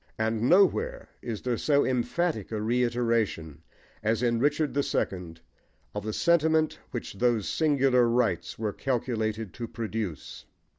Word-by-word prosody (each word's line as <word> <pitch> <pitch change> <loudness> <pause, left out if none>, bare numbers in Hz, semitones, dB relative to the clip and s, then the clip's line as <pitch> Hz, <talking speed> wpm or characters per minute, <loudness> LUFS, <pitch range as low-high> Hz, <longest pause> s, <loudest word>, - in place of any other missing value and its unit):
And 110 +2 0
nowhere 455 - +3
is 115 -4 -5
there 125 -3 -1
so 145 -2 +3
emphatic 125 - -1
a 110 - -2
reiteration 115 - 0 0.4
as 110 +2 0
in 120 -1 +2
Richard 145 +3 +1
the 140 - +2
Second 90 -10 -3 0.5
of 105 - -4
the 110 - -3
sentiment 160 +2 +2
which - - -5
those 115 0 +1
singular 135 -6 +3
rites 120 0 0
were 105 -2 -2
calculated 110 -5 -2
to 120 -2 -5
produce. 110 - -5
120 Hz, 135 wpm, -27 LUFS, 110-135 Hz, 0.5 s, nowhere